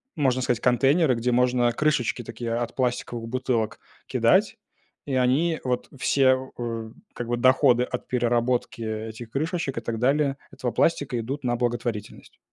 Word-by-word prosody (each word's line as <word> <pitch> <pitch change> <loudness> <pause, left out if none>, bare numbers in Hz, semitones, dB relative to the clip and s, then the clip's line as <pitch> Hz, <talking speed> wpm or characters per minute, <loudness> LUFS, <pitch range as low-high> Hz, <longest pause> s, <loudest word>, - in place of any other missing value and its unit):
можно 130 -4 +1
сказать, 125 -2 0
контейнеры, 135 +4 +3
где 120 +2 0
можно 125 0 +3
крышечки 130 -2 0
такие 115 +1 -5
от 120 0 -3
пластиковых 120 -2 -2
бутылок 120 -3 -1 0.3
кидать, - - +3 0.5
и 135 - -1
они 140 +6 +2
вот 125 -1 -2
все, 130 0 +2
э, 115 -2 -4 0.2
как 120 - -5
бы, 120 0 0
доходы 130 0 +4
от 125 0 -5
переработки 120 -1 0
этих 110 +1 -5
крышечек 155 -1 -2
и - - -12
так 115 -1 -3
далее, 140 +2 +2
этого 125 - -3
пластика, 140 +1 +1
идут 135 +5 -4
на 120 -1 +1
благотворительность. 120 -2 -4
125 Hz, 150 wpm, -25 LUFS, 120-130 Hz, 0.5 s, доходы